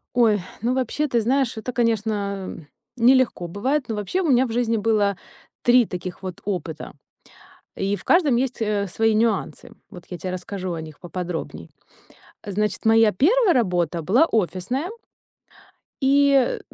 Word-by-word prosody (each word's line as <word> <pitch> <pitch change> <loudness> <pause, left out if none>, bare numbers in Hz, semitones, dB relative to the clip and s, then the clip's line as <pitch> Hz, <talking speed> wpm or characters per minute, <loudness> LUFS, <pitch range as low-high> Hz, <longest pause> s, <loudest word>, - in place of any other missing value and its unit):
Ой, 220 -4 +4 0.2
ну 245 +2 0
вообще, 265 +4 -1
ты 235 -3 +1
знаешь, 255 0 0
это 245 +3 -5
конечно 205 -7 -2 0.3
нелегко 245 -7 +3
бывает, 260 - -1
но 220 - -3
вообще, 210 - -2
у 330 - 0
меня 255 0 +4
в 235 - -6
жизни 230 -1 0
было 210 -2 +1 0.5
3 245 -1 +5
таких 180 +1 -6
вот 185 -2 -7
опыта. 170 -6 -4 0.8
И 195 +1 -1
в - - -11
каждом 315 -8 +3
есть, 250 -1 -1
э, 210 -2 0
свои 220 +4 +1
нюансы. 220 -2 -1 0.2
Вот 175 - -12
я 175 - -6
те 185 - -4
расскажу 185 0 -5
о 165 - -5
них 155 -2 -11
поподробней. 180 -1 -6 0.8
Значит, 210 +1 -2
моя 225 0 +5
1 370 - +3
работа 175 - 0
была 240 - +4
офисная 220 - -1 1.1
и 275 -1 +3
220 Hz, 145 wpm, -23 LUFS, 185-250 Hz, 1.1 s, 3